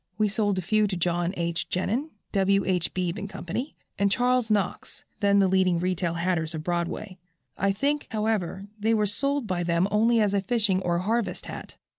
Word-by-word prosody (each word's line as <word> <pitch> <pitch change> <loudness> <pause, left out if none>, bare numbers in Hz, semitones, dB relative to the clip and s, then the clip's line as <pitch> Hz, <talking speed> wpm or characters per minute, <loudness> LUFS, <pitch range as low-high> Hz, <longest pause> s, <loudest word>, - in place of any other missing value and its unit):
We 215 -1 +2
sold 205 -1 0
a 185 - -1
few 215 +3 +2
to 190 -2 -3
John 175 0 0
H. 170 -1 -2
Genin, 230 - -1 0.2
W. 195 0 +2
H. 180 -3 0
Beebe 185 +2 -2
& - - -13
Co., - - -8 0.5
and 200 0 +3
Charles 250 0 +2
Knox, 205 -4 -1
then 200 0 +3
the 195 -1 +5
leading 185 -2 +3
retail 175 -1 -1
hatters 170 -2 0
of 155 - -5
Broadway. 175 +3 -3 0.4
I 195 +2 +1
think, 285 +9 -1
however, 210 -4 -1
they 220 +2 +2
were 210 -1 +2
sold 275 +6 0
by 185 -4 -1
them 170 +1 +2
only 225 +3 +3
as 205 -2 +2
a 200 - +2
fishing 200 -2 +1
or 175 -2 0
harvest 220 +5 -1
hat. - - -8
195 Hz, 190 wpm, -26 LUFS, 180-215 Hz, 0.5 s, the